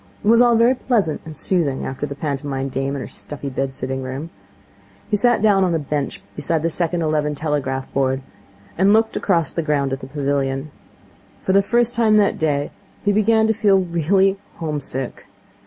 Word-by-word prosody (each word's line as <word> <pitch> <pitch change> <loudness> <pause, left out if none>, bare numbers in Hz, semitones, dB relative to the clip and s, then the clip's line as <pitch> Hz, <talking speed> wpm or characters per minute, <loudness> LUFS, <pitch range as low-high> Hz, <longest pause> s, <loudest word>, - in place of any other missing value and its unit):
It - - -3
was 230 +2 +6
all 240 -1 +5
very 235 +3 +5
pleasant 225 - 0
and 155 -2 -7
soothing 160 -8 0
after 135 +2 -4
the 140 - -6
pantomime 135 -2 -3
dame 135 +2 -2
and 140 - -4
her - - -7
stuffy 145 -1 -7
bed 135 0 -3
sitting 130 +1 -3
room. 135 +5 -6 0.8
He - - +4
sat 235 0 +3
down 200 -3 +4
on 175 -2 +1
a - - +3
bench 145 -2 -3
beside 160 -2 -1
the 165 - +1
second 170 0 0
eleven 150 -1 0
telegraph 140 -3 -2
board, 135 -1 0 0.6
and 195 +2 +5
looked 220 0 +2
across 170 -6 +1
the 170 - -1
ground 145 -3 0
at 135 - -3
the 130 - -9
pavilion. 140 0 -2 0.7
For 190 - +1
the 195 - +6
first 240 +3 +1
time 225 -3 +3
that 205 -1 +2
day 145 -2 0 0.3
he 205 - +4
began 220 +2 +3
to 220 - +2
feel 210 -3 +3
really 190 +2 +2 0.2
home 155 -3 -3
sick. 135 -2 -5
155 Hz, 190 wpm, -21 LUFS, 140-200 Hz, 0.8 s, was